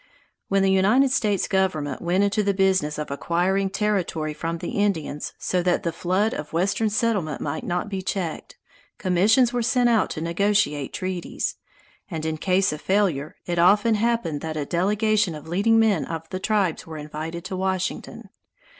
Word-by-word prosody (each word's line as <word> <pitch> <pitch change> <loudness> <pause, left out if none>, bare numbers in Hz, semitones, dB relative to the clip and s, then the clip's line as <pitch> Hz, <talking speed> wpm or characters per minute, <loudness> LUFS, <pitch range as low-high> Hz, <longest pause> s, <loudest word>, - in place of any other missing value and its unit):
When 195 0 +2
the 195 - +3
United 215 +8 +4
States 210 -6 +1
Government 180 -9 0
went 180 +3 +1
into 200 +1 +1
the 200 -1 0
business 190 -6 +2
of 150 -2 -4
acquiring 180 +6 0
territory 190 -7 -1
from 165 +2 -3
the - - -5
Indians 165 -8 -1
so 180 - -1
that 175 0 +1
the 170 - 0
flood 185 +6 0
of 150 0 -6
western 195 +6 +1
settlement 205 - 0
might 145 +2 -3
not 180 +3 -2
be 195 -2 -4
checked, 185 -3 -4 0.4
commissions 210 +7 +3
were 245 - 0
sent 240 +1 +2
out 230 -2 +2
to - - -5
negotiate 170 -4 +1
treaties, 185 -2 -3 0.5
and 160 -4 -4
in 160 0 -2
case 185 +1 +1
of 150 - -7
failure 185 -8 0
it 175 -1 -1
often 205 +6 +5
happened 215 -9 0
that 160 -1 -4
a 145 - -2
delegation 205 +2 +1
of 150 +1 -10
leading 200 +7 +2
men 215 -7 +3
of 165 -1 -6
the 185 - -3
tribe 200 -4 +1
were 160 -1 -7
invited 155 +3 -6
to 190 - -4
Washington. 185 0 -3
185 Hz, 170 wpm, -24 LUFS, 165-205 Hz, 0.5 s, often